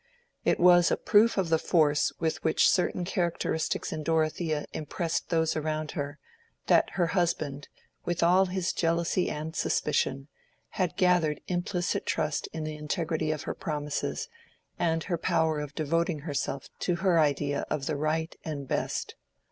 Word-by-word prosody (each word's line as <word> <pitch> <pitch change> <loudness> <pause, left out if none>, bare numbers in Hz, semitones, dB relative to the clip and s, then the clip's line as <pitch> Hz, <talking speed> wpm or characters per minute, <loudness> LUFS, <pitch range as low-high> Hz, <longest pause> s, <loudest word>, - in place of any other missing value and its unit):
It - - +2
was 175 -1 +6
a - - +1
proof 215 +2 +4
of 185 -4 +1
the 160 -1 +3
force 150 -4 +3
with 160 -1 -1
which 160 - +4
certain 180 -1 +1
characteristics 170 -4 -1
in 155 - -4
Dorothea 155 -1 0
impressed 165 +2 -3
those 160 -1 +1
around 155 0 -2
her, 145 -1 -4 0.5
that - - +4
her 175 -2 +2
husband, 155 -5 -1 0.4
with 175 -1 -1
all 185 +3 +5
his 185 0 -1
jealousy 170 +2 +1
and 155 +2 -5
suspicion, 135 -4 0 0.4
had 180 -4 -2
gathered 175 -5 +2
implicit 175 0 -1
trust 150 -1 -1
in 160 - -4
the 155 0 -4
integrity 160 +1 -2
of 155 -2 -3
her - - -3
promises, 150 - -3 0.5
and 165 -1 +1
her 170 -4 -2
power 160 -2 +1
of 150 -1 -6
devoting 165 0 0
herself 140 -3 -3
to 175 - 0
her 175 -1 +2
idea 145 -1 +1
of 145 -3 -2
the 155 - -1
right 155 +3 -1
and 145 -4 -5
best. - - -2
160 Hz, 155 wpm, -28 LUFS, 150-175 Hz, 0.5 s, was